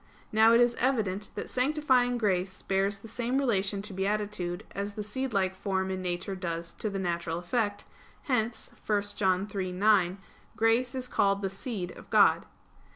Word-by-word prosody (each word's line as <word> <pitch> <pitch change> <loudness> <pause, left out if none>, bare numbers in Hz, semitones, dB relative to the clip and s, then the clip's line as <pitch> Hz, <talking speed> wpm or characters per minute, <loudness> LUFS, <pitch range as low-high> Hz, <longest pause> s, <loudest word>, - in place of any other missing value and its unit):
Now 220 +1 +6
it 230 - +6
is 240 0 +4
evident 215 -6 0
that - - -4
sanctifying 255 -2 +2
grace 190 -4 -1
bears 195 +1 +1
the 200 - -12
same 240 +3 -1
relation 200 -7 +1
to 205 -1 -5
beatitude 195 -2 -2
as 200 +1 -4
the 210 - -3
seedlike 205 -4 -1
form 190 0 -2
in 190 0 -3
nature 180 +2 -2
does 170 -3 -4
to 215 - 0
the 195 - -4
natural 170 -3 -2
effect; 205 +3 -1 0.4
hence 235 -4 -1 0.2
(1 210 -1 +2
John 190 -1 +2
3:9) 190 -1 +2 0.4
grace 235 +3 +2
is 255 -1 -3
called 200 -3 +1
the 195 - -1
"seed" 195 -3 -4
of - - -13
God. - - +5
200 Hz, 160 wpm, -29 LUFS, 190-230 Hz, 0.4 s, Now